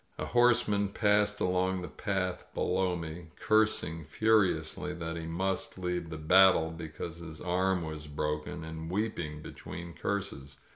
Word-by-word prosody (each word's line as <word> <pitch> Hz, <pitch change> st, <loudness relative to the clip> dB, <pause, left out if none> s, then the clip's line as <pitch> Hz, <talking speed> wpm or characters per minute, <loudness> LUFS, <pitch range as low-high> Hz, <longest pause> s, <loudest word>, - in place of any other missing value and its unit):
A -, -, -3 dB
horseman 115 Hz, -4 st, +3 dB
passed 105 Hz, 0 st, +2 dB
along 90 Hz, 0 st, +1 dB
the -, -, -4 dB
path 95 Hz, -3 st, -2 dB
below 90 Hz, 0 st, +1 dB
me, 85 Hz, 0 st, -6 dB
cursing 110 Hz, -7 st, +2 dB
furiously 90 Hz, -2 st, +1 dB
that 80 Hz, -1 st, -4 dB
he 80 Hz, -1 st, -5 dB
must 95 Hz, +4 st, -2 dB
leave 90 Hz, -2 st, -2 dB
the 80 Hz, -, -5 dB
battle 80 Hz, 0 st, +5 dB
because 80 Hz, 0 st, -6 dB
his 80 Hz, -2 st, -9 dB
arm 90 Hz, 0 st, +1 dB
was 80 Hz, -1 st, -6 dB
broken, 75 Hz, +2 st, -3 dB
and 80 Hz, 0 st, -6 dB
weeping 85 Hz, -7 st, -2 dB
be -, -, -7 dB
tween 85 Hz, 0 st, -8 dB
curses. 85 Hz, -6 st, -4 dB
90 Hz, 145 wpm, -31 LUFS, 80-95 Hz, -, battle